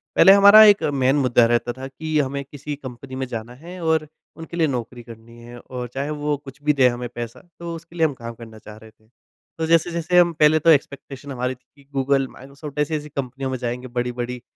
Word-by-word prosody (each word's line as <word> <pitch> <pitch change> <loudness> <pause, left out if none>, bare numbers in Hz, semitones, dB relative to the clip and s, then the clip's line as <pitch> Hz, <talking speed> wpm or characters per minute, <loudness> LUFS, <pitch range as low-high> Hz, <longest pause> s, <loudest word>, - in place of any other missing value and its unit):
पहले 195 - +8
हमारा 200 +2 +9
एक 205 -1 +5
मेन 135 0 +2
मुद्दा 125 -4 +3
रहता 120 +1 0
था 130 +1 -8
कि 155 +3 -4
हमें 140 0 -2
किसी 145 +1 -7
कंपनी 130 -1 -10
में 130 - -3
जाना 115 0 -6
है 175 +7 -11
और 160 -1 +1 0.3
उनके 165 +1 -8
लिए 165 -2 +3
नौकरी 120 -2 -5
करनी 115 0 -14
है 120 +1 -11
और 125 0 -7
चाहे 140 +2 -3
वो 150 0 -2
कुछ 140 0 -14
भी 150 - +3
दे 135 -3 +4
हमें 120 0 -5
पैसा 120 -1 -7 0.2
तो 170 0 -6
उसके 165 +1 -13
लिए 165 -2 +3
हम 150 - 0
काम 115 -2 -8
करना 115 -1 -12
चाह 105 0 -12
रहे 110 0 -15
थे। 110 0 -32 0.5
तो 160 - -1
जैस-जैसे 170 +1 +2
हम 170 -1 +4
पहले 155 0 +4
तो 165 - +2
एक्सपेक्टेशन 140 -2 0
हमारी 125 0 -3
थी 125 - -36
कि 140 - -20
गूगल, 135 0 +1
माइक्रोसॉफ्ट 140 +3 -10
ऐसी-ऐसी 150 0 -2
कंपनियों 135 -1 -4
में 130 - -2
जाएँगे 125 +1 -4
बड़ी-बड़ी 125 0 -4
135 Hz, 220 wpm, -22 LUFS, 125-155 Hz, 0.5 s, हमारा